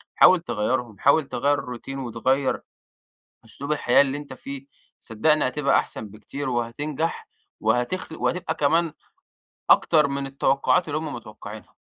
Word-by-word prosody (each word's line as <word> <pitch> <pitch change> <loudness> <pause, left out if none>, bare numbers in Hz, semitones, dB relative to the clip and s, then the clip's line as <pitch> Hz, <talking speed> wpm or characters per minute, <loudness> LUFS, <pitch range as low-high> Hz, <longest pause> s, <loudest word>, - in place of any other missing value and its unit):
حاول 185 - +7
تغيَّرهم 120 - -2
حاول 140 +1 +4
تغيَّر 145 +1 +1
الروتين 135 +1 -6
وتغيَّر 130 +3 0 0.8
أسلوب 140 +6 -5
الحياة 125 -4 +4
اللي 140 0 -2
أنت 140 -2 -9
فيه، 140 +1 -8 0.3
صدقني 145 +6 +2
هتبقى 140 +1 +2
أحسن 110 - -4
بكتير، 130 +7 -6
وهتنجح 145 +7 -2 0.3
وهتخل 160 +7 -1
وهتبقى 180 +1 -1
كمان 160 +2 +2 0.8
أكتر 155 -3 +5
من 140 0 -3
التوقّعات 135 +4 +2
اللي 150 +1 -1
هم 155 -2 -5
متوقّعينها. 110 -2 -10
135 Hz, 125 wpm, -24 LUFS, 120-150 Hz, 0.8 s, حاول